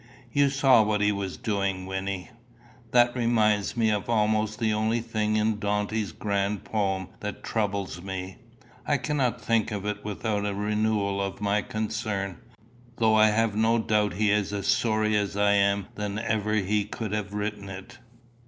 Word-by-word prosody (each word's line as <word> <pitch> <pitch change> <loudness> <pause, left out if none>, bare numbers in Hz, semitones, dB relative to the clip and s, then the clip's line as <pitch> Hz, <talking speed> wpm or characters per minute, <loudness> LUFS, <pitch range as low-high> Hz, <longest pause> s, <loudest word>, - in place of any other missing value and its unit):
"You 140 -1 +3
saw 135 -3 +5
what 105 -1 +1
he 105 0 +3
was 100 -2 -4
doing, 100 -3 -1
Wynnie? 95 0 -4 0.6
That 120 0 +4
reminds 110 -3 +2
me 110 -2 +3
of 105 +1 -2
almost 110 -1 +1
the 110 -2 +1
only 110 +2 +1
thing 110 -2 -1
in 110 0 +1
Dante's 105 -1 -1
grand 100 +2 -1
poem 95 -3 -1
that 105 -1 -6
troubles 100 -5 -2
me. 95 0 -6 0.5
I 145 - +3
cannot 130 -4 0
think 115 -1 +1
of 100 -1 -4
it 105 0 -3
without 105 0 -2
a 100 -1 -2
renewal 105 -1 0
of 100 0 -3
my 105 0 +1
concern, 105 -4 -3 0.6
though 110 -1 +3
I 110 0 +6
have 110 0 +1
no 110 +2 +3
doubt 105 -3 +1
he 105 +1 +2
is 105 -1 +1
as 100 -1 -3
sorry 110 -1 +2
now 105 - +3
as 100 0 -3
I 100 0 +4
am 100 -1 +2
that 105 0 -4
ever 110 -1 0
he 105 0 +1
could 110 0 -5
have 105 -1 -3
written 105 -1 -3
it. 95 +5 -9
105 Hz, 170 wpm, -27 LUFS, 100-110 Hz, 0.6 s, I